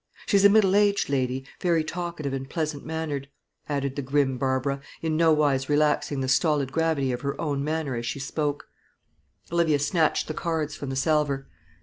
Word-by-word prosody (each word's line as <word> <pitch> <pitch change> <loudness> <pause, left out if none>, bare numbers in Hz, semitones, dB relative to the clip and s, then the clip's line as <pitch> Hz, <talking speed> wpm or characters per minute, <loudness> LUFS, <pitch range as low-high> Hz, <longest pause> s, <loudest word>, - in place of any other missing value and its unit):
She's 200 -2 +3
a 200 - +9
middle 200 -2 +4
aged 205 -4 +3
lady, 130 -1 -1
very 170 -3 +2
talkative 170 -4 -4
and 135 0 -4
pleasant 155 -3 -3
mannered," 155 -3 -4 0.4
added 140 -2 -1
the 140 - -2
grim 135 -1 0
Barbara, 135 +1 0 0.2
in 160 -1 0
nowise 150 -4 +3
relaxing 150 -1 +1
the 130 - -1
stolid 140 -1 +2
gravity 160 -4 +1
of 125 - -3
her 140 -1 -3
own 145 -3 -1
manner 155 -2 -2
as 120 0 -4
she - - -3
spoke. 145 +1 -3 0.8
Olivia 170 -3 +3
snatched 155 +2 +1
the 155 - -3
cards 155 -3 -2
from 140 - -6
the 135 - -3
salver. 140 -1 +1
145 Hz, 170 wpm, -26 LUFS, 135-160 Hz, 0.8 s, a